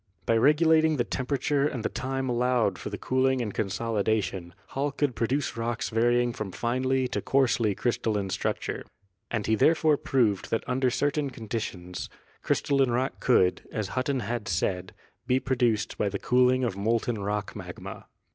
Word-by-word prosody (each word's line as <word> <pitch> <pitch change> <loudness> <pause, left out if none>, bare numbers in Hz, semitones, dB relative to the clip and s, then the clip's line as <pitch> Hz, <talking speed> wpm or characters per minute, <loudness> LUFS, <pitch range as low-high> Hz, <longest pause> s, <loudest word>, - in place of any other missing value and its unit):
By 115 - +3
regulating 155 +4 +4
the 120 - +2
temperature 140 +3 0
and 125 -6 -4
the - - +1
time 135 0 -3
allowed 120 -5 +1
for - - -5
the 100 - -5
cooling 130 +2 +1
and 110 -5 -3
consolidation, 100 -4 -1
Hall 140 +2 -1
could 145 -1 0
produce 130 +6 -1
rocks 115 0 -2
varying 120 +1 +2
from 105 -4 -5
finely 130 +4 0
to - - -2
coarsely 120 -6 +2
crystalline 105 -4 -1
structure. - - -2 0.5
And 110 -3 -2
he 110 - +1
therefore 155 +5 +4
proved 115 -10 +1
that 115 - 0
under 130 0 +1
certain 145 +2 0
conditions 105 -7 -5 0.3
crystalline 135 -2 +2
rock 125 +3 -1
could, 95 -8 +3
as 105 -3 -3
Hutton 130 +2 -1
had 115 -1 -3
said, 90 0 -1 0.3
be 130 0 +3
produced 120 -6 0
by 105 - +1
the 100 - -3
cooling 125 +3 +3
of 115 -6 -1
molten 110 +2 0
rock 105 0 -3
magma. - - -8
120 Hz, 155 wpm, -27 LUFS, 105-130 Hz, 0.5 s, regulating